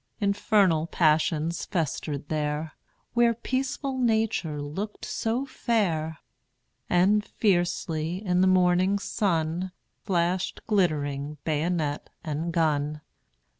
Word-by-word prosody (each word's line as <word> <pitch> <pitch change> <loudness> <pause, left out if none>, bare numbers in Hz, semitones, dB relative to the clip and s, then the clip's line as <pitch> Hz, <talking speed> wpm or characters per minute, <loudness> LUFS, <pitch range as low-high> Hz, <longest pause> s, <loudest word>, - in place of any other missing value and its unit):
Infernal 200 -5 +2
passions 160 0 +2
festered 150 -4 -2
there, 150 0 -2 0.4
Where 235 -1 +4
peaceful 260 +2 -2
Nature 220 -10 +1
looked 190 +9 -5
so 235 +4 -1
fair; 180 - 0 0.7
And 195 +4 +4
fiercely, 175 -3 0
in 180 -1 +2
the 190 - +5
morning 185 +1 +4
sun, 180 -3 -1 0.3
Flashed 180 0 0
glitt'ring 150 -7 0
bayonet 155 -1 -1
and 160 +1 -2
gun. 150 -2 0
175 Hz, 95 wpm, -27 LUFS, 155-200 Hz, 0.7 s, the